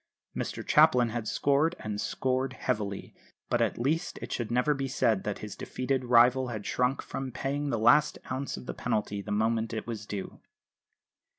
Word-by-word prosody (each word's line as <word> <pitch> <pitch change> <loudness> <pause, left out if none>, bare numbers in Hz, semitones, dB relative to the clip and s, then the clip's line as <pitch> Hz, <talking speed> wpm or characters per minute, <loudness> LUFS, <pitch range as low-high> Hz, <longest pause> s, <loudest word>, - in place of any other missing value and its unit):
Mr - - -4
Chaplin 120 -2 +5
had 115 -1 -4
scored, 145 +8 +2
and 105 -1 -4
scored 130 +1 -1
heavily; 105 -5 -3 0.4
but - - +2
at - - +1
least 145 +7 -1
it - - -7
should 120 -3 -2
never 125 +5 +2
be 135 -1 -2
said 115 -6 +1
that 105 -1 -3
his 100 -2 -7
defeated 130 +3 -2
rival 125 +2 +5
had 110 -4 -5
shrunk 125 +2 0
from 135 -1 -5
paying 140 +3 -2
the 115 - 0
last 120 +7 +4
ounce 135 +1 -3
of - - -9
the - - -4
penalty 105 -4 -2
the - - -7
moment 110 +2 0
it 110 - -4
was 110 -3 -6
due. 100 -2 -6
125 Hz, 180 wpm, -29 LUFS, 110-135 Hz, 0.4 s, Chaplin